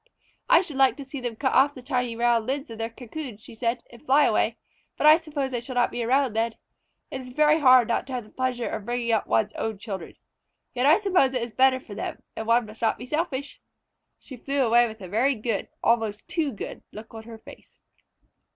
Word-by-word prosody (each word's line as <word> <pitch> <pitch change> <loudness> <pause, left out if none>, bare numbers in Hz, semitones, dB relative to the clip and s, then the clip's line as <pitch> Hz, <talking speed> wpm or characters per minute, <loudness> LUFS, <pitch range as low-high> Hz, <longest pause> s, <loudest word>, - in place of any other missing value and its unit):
"I 335 - +7
should 310 -7 -7
like 265 -3 +4
to 280 - -8
see 270 +1 -7
them 240 -2 -4
cut 260 +3 -1
off 280 +2 +4
the 255 - -10
tiny 250 -3 -1
round 235 -1 +2
lids 270 -1 -3
of 225 - -9
their 225 0 -2
cocoons," 240 -1 -8
she - - -12
said, 230 +1 -2
"and 235 +2 -15
fly 290 +1 +4
away, - - +1 0.4
but - - 0
I 305 +1 +9
suppose 290 -5 -4
I 240 - 0
shall 250 +2 -8
not 245 0 +2
be 240 - -4
around 260 0 +2
then. 225 +1 -1 0.6
It 265 - -5
is 255 - -10
very 300 +4 +3
hard 255 -5 +6
not 235 - -1
to 265 - -7
have 250 -2 -3
the 210 - -18
pleasure 255 -2 -2
of - - -4
bringing 240 0 -1
up 220 - +1
one's 115 0 +1
own 220 -2 -3
children. 195 -4 -7 0.6
Yet 255 +2 +1
I 310 - +7
suppose 365 -11 +2
it 245 - 0
is 235 - -6
better 260 +3 +3
for 220 - -11
them, - - -6
and 220 - -5
one 235 0 +3
must 215 +1 -13
not 225 - +1
be - - -8
selfish." 285 -1 -3 0.6
She 260 - -12
flew 275 +2 0
away 240 +1 +4
with 220 -1 -10
a 185 - -7
very 245 +9 +1
good, 220 -2 -3
almost 220 -3 0
too 315 -5 -1
good, 210 - -7
look 220 +2 -11
on 225 - -8
her 230 -1 -10
face. - - -16
245 Hz, 235 wpm, -25 LUFS, 225-270 Hz, 0.6 s, I